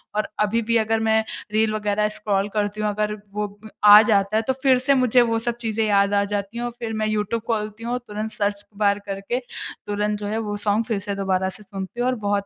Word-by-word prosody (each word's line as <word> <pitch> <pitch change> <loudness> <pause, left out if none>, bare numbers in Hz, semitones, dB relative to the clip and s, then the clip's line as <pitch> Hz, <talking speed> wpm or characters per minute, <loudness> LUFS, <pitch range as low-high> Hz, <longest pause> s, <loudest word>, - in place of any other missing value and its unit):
और 215 - 0
अभी 210 +2 +2
भी 230 +1 +1
अगर 225 0 +1
मैं 220 0 +2 0.3
रील 215 0 +2
वगैरह 210 0 0
स्क्रॉल 200 -1 0
करती 210 0 -1
हूँ 210 - +1
अगर 210 +1 -1 0.2
वो 210 0 -1 0.2
अ, - - -9 0.2
आ 210 0 +10
जाता 205 -2 +2
है - - +3
तो 265 - +2
फ़िर 260 -2 +5
से 270 +2 +3
मुझे 255 -2 +4
वो 230 -1 +1
सब 235 +1 -3
चीज़ें 225 -1 -1
याद 200 0 +3
आ 200 0 +3
जाती 200 +2 -4
हैं। 240 - -2
और 240 - -3
फ़िर 225 -2 -4
मैं 215 0 -1
यूट्यूब 215 +1 -1
खोलती 215 0 -2
हूँ 240 +1 -1
तुरंत 215 +1 -4
सर्च 205 -1 -1
बार 205 -1 +2
करके 195 +5 -3 0.5
तुरंत 210 0 -1
जो 205 - -4
है 215 +2 -2
वो 210 -2 -3
सॉन्ग 210 +2 +1
फ़िर 220 -4 -1
से 200 0 -4
दोबारा 190 -1 0
से 210 - -11
सुनती 195 +2 -7
हूँ 245 - +1
और 255 - +1
बहुत 200 0 +1
210 Hz, 240 wpm, -23 LUFS, 205-225 Hz, 0.5 s, आ